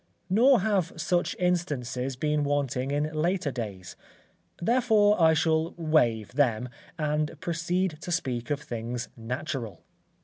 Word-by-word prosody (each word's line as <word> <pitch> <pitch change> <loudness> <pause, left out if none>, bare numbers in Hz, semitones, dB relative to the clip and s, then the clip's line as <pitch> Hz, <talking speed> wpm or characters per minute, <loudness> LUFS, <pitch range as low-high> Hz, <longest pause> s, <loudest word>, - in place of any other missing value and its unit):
Nor 240 +4 +5
have 195 -5 0
such 175 +2 0
instances 135 -8 -1
been 150 +2 0
wanting 140 -2 -1
in 150 +2 -1
later 165 0 0
days; 100 -8 -6 0.6
therefore, 215 -2 +3
I 160 0 +6
shall 160 +1 +1
wave 120 - +2
them, 125 -3 +1 0.3
and 150 0 -1
proceed 175 0 -1
to 175 - -5
speak 130 -8 -2
of 145 -1 -1
things 120 -3 -5
natural. 120 - -5
150 Hz, 125 wpm, -27 LUFS, 125-175 Hz, 0.6 s, I